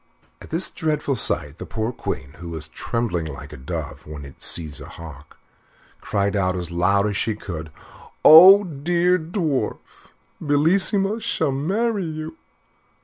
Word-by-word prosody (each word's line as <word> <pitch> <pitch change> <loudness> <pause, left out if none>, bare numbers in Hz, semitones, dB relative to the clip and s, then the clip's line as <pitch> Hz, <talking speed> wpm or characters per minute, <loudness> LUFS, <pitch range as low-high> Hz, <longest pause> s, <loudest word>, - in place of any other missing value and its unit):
At - - -12
this 165 +3 -1
dreadful 150 -3 -1
sight, 75 - 0
the - - -6
poor 110 +1 -3
Queen, 70 - -5
who 85 -1 -8
was 80 -2 -7
trembling 110 -8 -3
like 75 -3 -8
a - - -7
dove 65 +3 -7
when 75 -2 -8
it 70 - -14
sees 75 -4 -1
a - - -10
hawk, 75 -3 -12 0.6
cried 100 0 -1
out 95 -2 +1
as 90 -2 -5
loud 100 +4 +2
as 105 -1 -1
she 110 +3 -1
could, 85 -7 -7 0.6
"Oh! 185 +6 +10
dear 175 +2 +1
Mr. 160 +1 -10
Dwarf, 155 -9 -1 0.6
Bellissima 190 +8 +2
shall 160 -10 0
marry 195 - -1
you." 155 0 -6
120 Hz, 150 wpm, -22 LUFS, -, 0.6 s, Oh